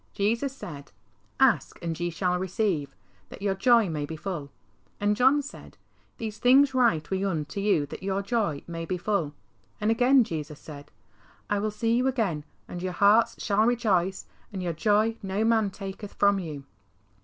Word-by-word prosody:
Jesus 230 +7 0
said, 145 - -9 0.3
" - - -38
Ask, - - +3
and 165 -1 -3
ye 175 0 -1
shall 180 +1 -1
receive, 185 - -1 0.3
that - - -10
your 200 -1 +1
joy 230 +2 +4
may 155 -3 -3
be 160 +2 -5
full." 155 -4 -5 0.5
And 205 0 +2
John 265 +5 +4
said, 285 - -11 0.4
"These 220 -2 -5
things 265 +2 +5
write 230 -12 +2
we 190 0 0
unto 165 -3 -2
you 195 -8 +2
that 145 - -9
your 195 +1 -1
joy 200 - -1
may 165 -1 -5
be 180 +2 -2
full." 175 -6 -1 0.4
And 210 +1 +1
again 250 +3 +5
Jesus 155 -7 -6
said, 145 -2 -11 0.3
" - - -31
I 205 - +2
will 215 +1 -1
see 225 +2 0
you 250 +2 +2
again, 200 - -1 0.2
and 175 - -7
your 185 0 -3
hearts 215 +5 +4
shall 205 +1 +2
rejoice, 195 -6 +1 0.3
and 190 -3 -5
your 175 -1 -1
joy 215 +6 +2
no 195 +3 -1
man 225 -3 +3
taketh 195 +1 -8
from 200 -1 +3
you." 155 -6 -6
200 Hz, 180 wpm, -27 LUFS, 170-225 Hz, 0.5 s, things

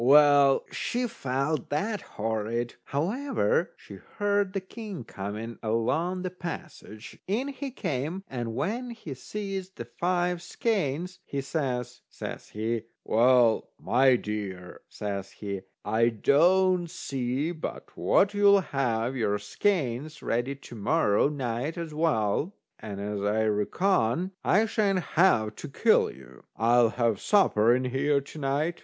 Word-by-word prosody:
Well, 140 0 +6
she 245 +1 -1
felt 135 - -2
that 205 +8 -1
horrid. 115 +2 -2
However, 275 - 0
she - - -12 0.2
heard 205 -2 +1
the 195 - 0
king 195 - -8
coming 110 +2 -6
along 155 +12 0
the 185 - -3
passage. 170 - -8
In 235 +9 0
he 280 0 -5
came, 160 - -3
and 120 -3 -4
when 240 - -2
he 220 - -7
sees 195 +5 -5
the 120 -11 -8
five 175 +6 -1
skeins, 180 - -1
he 140 - -4
says, 125 -4 -3
says - - -7
he: 110 +2 -2 0.2
"Well, 120 0 +4
my 125 +5 +4
dear," 100 -5 -5
says 100 -2 -4
he, 100 -2 -5 0.2
"I 110 +3 +3
don't 175 - +3
see 135 +2 -2
but 160 -3 -7
what 200 +1 +3
you'll 200 -1 +6
have 125 -5 -1
your 105 -4 +1
skeins 145 - -1
ready 120 +4 -1
to 135 -3 -13
morrow 110 +1 +2
night 135 +2 -3
as 165 -2 -5
well, 150 - +1 0.2
and 100 -2 -6
as 100 0 -3
I 105 +2 +1
reckon 140 - +1
I 215 +3 +4
sha'n't 200 -5 +1
have 110 - +4
to - - -6
kill - - +3
you, 65 -2 -14
I'll 120 +1 +4
have 115 -3 0
supper 120 - +4
in 130 +1 -1
here 140 +3 +2
to 140 +3 -10
night." 150 +5 -1
140 Hz, 135 wpm, -28 LUFS, 115-185 Hz, 0.2 s, Well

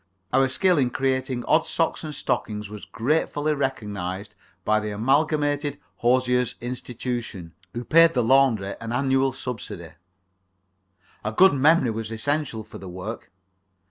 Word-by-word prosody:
Our 135 -1 +4
skill 180 +4 +2
in 130 -3 +2
creating 130 -1 -1
odd 160 +1 +3
socks 165 0 0
and 155 -2 -5
stockings 105 -5 -2
was 105 -1 -8
gratefully 150 +4 0
recognized 105 -8 -3 0.3
by 110 0 +3
the 105 0 -4
Amalgamated 145 +5 +1 0.2
Hosiers' 125 0 +2
Institution, 120 -7 -5 0.2
who 120 +1 -4
paid 165 0 +6
the 125 - +3
laundry 115 -6 +3
an 115 0 -4
annual 135 +1 +2
subsidy. 115 -10 -6 1.3
A 110 - -2
good 190 +10 +6
memory 140 -2 +4
was 110 0 -4
essential 125 0 -2
for - - -11
the 95 - -8
work. 95 +5 -7
125 Hz, 135 wpm, -24 LUFS, 110-145 Hz, 1.3 s, paid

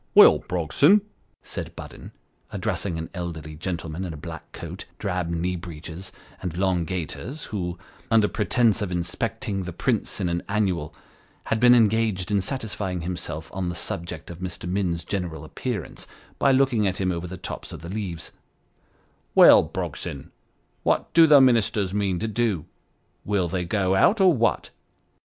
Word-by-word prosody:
" - - -41
Well, - - +9
Brogson," 140 - +3 0.4
said - - -6
Budden, - - -10 0.4
addressing 90 -5 -2
an 80 0 -6
elderly 85 -4 -5
gentleman 85 +1 -4
in 90 -3 -4
a - - -8
black - - -9
coat, - - -8
drab 90 -2 -2
knee 85 +2 -1
breeches, 85 +1 -8 0.3
and 85 -2 -4
long 90 -3 +1
gaiters, 95 - -5
who, 90 -4 -4 0.3
under 110 -2 +5
pretence 115 +1 +2
of 100 -3 -2
inspecting 95 +4 -2
the 90 -1 -5
prints 110 +6 -1
in 95 - 0
an 85 0 -1
Annual, 95 -7 0 0.5
had 115 - -1
been 120 +1 +7
engaged 110 -4 +2
in 100 -1 +3
satisfying 105 -6 -3
himself 85 -2 -5
on 90 -1 -2
the 85 - -4
subject 85 0 -5
of 85 - -9
Mr. 90 -1 -5
Minns's 90 -2 -1
general 85 -6 -3
appearance, 100 - -5 0.3
by 135 - +4
looking 130 -6 +3
at 95 - -1
him 95 -1 +1
over 85 0 -3
the 95 +1 -7
tops 90 - -7
of - - -8
the 85 - -8
leaves 95 -5 -5 0.5
" - - -39
Well, - - +9
Brogson, 70 - -5 0.5
what - - 0
do 165 0 +8
Ministers 110 -6 +3
mean 100 -3 0
to 110 - -2
do? 110 -6 0 0.6
Will 100 -4 0
they 90 +1 -2
go 95 0 +1
out, 195 - +4
or 185 -2 +6
what 115 -4 0
95 Hz, 160 wpm, -25 LUFS, 85-110 Hz, 0.6 s, Well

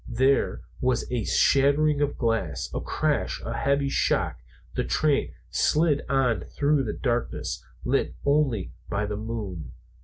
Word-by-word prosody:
There 130 +4 +2 0.2
was 125 -2 +1
a 120 -5 -1
shattering 145 +2 +3
of 145 -1 0
glass, 115 - -1
a - - -2
crash, - - -1
a - - -3
heavy 140 0 +1
shock, 100 - +1
and - - -21
the - - +2
train 150 -3 +1 0.2
slid 150 -2 +2
on 125 -8 +2
through 145 -1 +1
the 105 - -2
darkness, 120 -2 -2 0.2
lit - - 0
only 140 -9 +1 0.2
by 105 +1 0
the 105 0 -3
moon. 105 -7 -5
130 Hz, 145 wpm, -26 LUFS, 110-140 Hz, 0.2 s, shattering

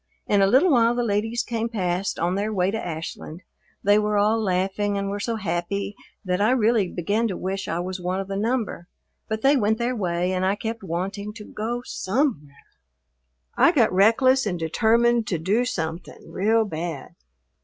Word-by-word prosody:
In 205 -1 +2
a 195 - +5
little 275 - +4
while 235 -2 +4
the 245 - 0
ladies 225 +2 0
came 230 -1 -2
past 185 -3 -2
on 175 +2 0
their 205 +3 -1
way 190 -2 +1
to 220 +1 -3
Ashland. 165 +1 -6 0.4
They 205 +1 +5
were 210 0 0
all 215 +2 +2
laughing 195 +1 0
and 200 0 -2
were 205 - -3
so 230 +3 -2
happy 200 +1 -3 0.3
that 180 +1 0
I 210 - +4
really 225 -4 +2
began 205 +7 0
to 190 - -4
wish 195 +1 -3
I 165 - -2
was 185 +1 -5
one 180 +2 -2
of 195 - -4
the 195 - -4
number, 220 -4 -2 0.4
but 220 -1 -3
they 275 +2 +5
went 220 -3 +2
their 245 +2 -1
way 180 -3 -1
and 185 0 -1
I 190 +2 +2
kept 225 +2 -5
wanting 195 +4 -4
to 210 -1 -10
go 235 +3 -4
somewhere. 185 - -2 0.9
I - - +5
got 240 - +3
reckless 230 +6 +4
and 180 -3 -2
determined 230 +7 +2
to 175 - 0
do 200 +10 +1
something 165 -7 -5
real 220 +3 +2
bad. 165 -5 -5
205 Hz, 185 wpm, -24 LUFS, 185-225 Hz, 0.9 s, a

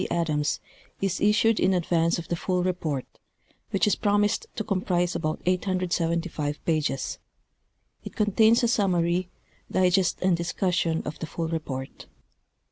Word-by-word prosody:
Adams, 150 -4 0 0.4
is 195 -2 -1
issued 215 +2 +3
in 190 - +3
advance 170 -1 +1
of 170 - -6
the 170 - -1
full 180 +1 -1
report, 165 -7 -2 0.6
which 195 - +2
is 210 - +3
jjrom 205 0 +3
isecl 415 - -1
to 220 - -2
comprise 180 -3 0
about 155 0 -2
875 175 -4 -1
pages. 155 -4 -1 0.8
It - - -9
contains 220 +3 +4
a - - +4
summary, 180 -5 +1 0.4
digest 185 0 +2
and 185 -2 +4
discussion 170 -1 0
of 150 - -6
the 160 - -4
full 165 +1 -3
report. 140 -5 -5
180 Hz, 135 wpm, -26 LUFS, 165-195 Hz, 0.8 s, contains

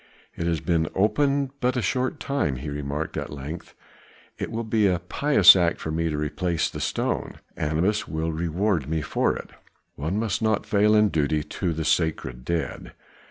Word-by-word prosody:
"It 85 - -3
has 85 -2 0
been 80 -3 +1
opened 140 +7 +2
but 125 +1 +1
a - - +1
short 130 +8 -1
time," 140 - -1
he 70 +4 -5
remarked 75 +2 -4
at - - -3
length. 75 +4 -7 0.6
"It - - -3
will 115 +1 -3
be 110 -2 +2
a 90 -2 +2
pious 100 - +6
act 85 -2 +1
for 80 - -4
me 80 +1 0
to 75 - -2
replace 75 +3 -1
the - - -6
stone; - - -2 0.2
Anubis 85 +8 0
will 80 +1 -2
reward 85 0 -1
me 80 0 0
for - - 0
it. - - -8 0.4
One 80 +7 -3
must 110 0 -1
not 110 -2 +1
fail 105 +1 +3
in 105 -1 +5
duty 75 -2 0
to 90 +3 -3
the 80 -1 -3
sacred 70 -8 0
dead." 80 -2 -3
85 Hz, 180 wpm, -25 LUFS, 75-105 Hz, 0.6 s, pious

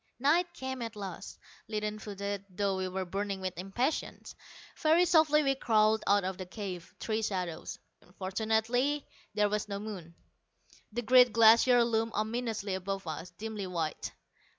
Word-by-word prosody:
Night 325 +7 +2
came 260 -1 -5
at 230 -1 -5
last, 195 -3 -7 0.3
leaden 210 0 -3
footed, 200 -1 -4
though 195 +1 -1
we 190 0 -2
were 185 0 -3
burning 195 +2 -3
with 185 -1 -4
impatience. 195 - -3 0.4
Very 325 +3 +4
softly 310 -3 +4
we 275 -1 +3
crawled 220 -4 +2
out 200 0 +4
of 185 0 -3
the 185 - -4
cave, 185 -4 -7
three 220 0 -1
shadows. 180 -6 -3 0.4
Fortunately 220 +8 0 0.3
there 210 0 +3
was 210 0 -2
no 200 - -3
moon. 195 -6 -7 0.8
The 240 +3 -3
great 250 +1 +6
Glacier 230 +2 +6
loomed 225 -1 0
ominously 220 -2 -2
above 195 +1 -3
us, 165 +2 -5
dimly 215 -3 -5
white. 165 -4 -3
210 Hz, 150 wpm, -31 LUFS, 190-235 Hz, 0.8 s, great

